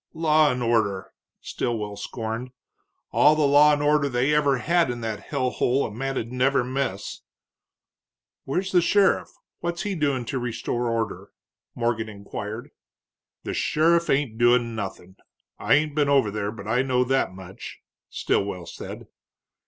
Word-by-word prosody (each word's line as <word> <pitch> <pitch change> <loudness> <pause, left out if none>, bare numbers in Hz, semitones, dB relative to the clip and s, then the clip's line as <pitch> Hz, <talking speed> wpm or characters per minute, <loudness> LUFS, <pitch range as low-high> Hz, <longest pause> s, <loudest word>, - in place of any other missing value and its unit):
"Law 155 -2 +4
and 125 -1 -2
order!" 110 -5 0 0.3
Stilwell 105 -3 -3
scorned. 115 +3 -5 0.6
"All 150 +1 +5
the 155 - +1
law 145 +2 +6
and 145 0 0
order 145 -1 +3
they 130 +3 +1
ever 145 -3 +3
had 170 +3 +2
in 120 -1 -4
that 110 -2 -3
hell 130 -1 -2
hole 130 +3 +1
a - - -5
man'd 125 0 -3
never 130 +1 +2
miss." 125 -6 -3 1.2
"Where's 185 +8 -2
the 180 - +5
sheriff 195 +3 +3 0.3
what's 170 0 -3
he 205 -1 -2
doing 140 -7 0
to 130 +2 -3
restore 120 0 -2
order?" 115 -2 -3 0.5
Morgan 115 -2 -1
inquired. 105 +5 -7 0.7
"The - - -4
sheriff 170 +2 +2
ain't 135 -5 0
doin' 120 -1 +3
nothing. 95 -3 -6 0.4
I - - +4
ain't 150 0 +1
been 145 -1 +1
over 135 -7 +3
there, 100 0 -3
but 105 -2 -9
I 120 +3 +2
know 130 -1 +1
that 135 -4 +1
much," 95 0 -10 0.3
Stilwell 95 -3 -1
said. - - -8
125 Hz, 150 wpm, -24 LUFS, 110-145 Hz, 1.2 s, law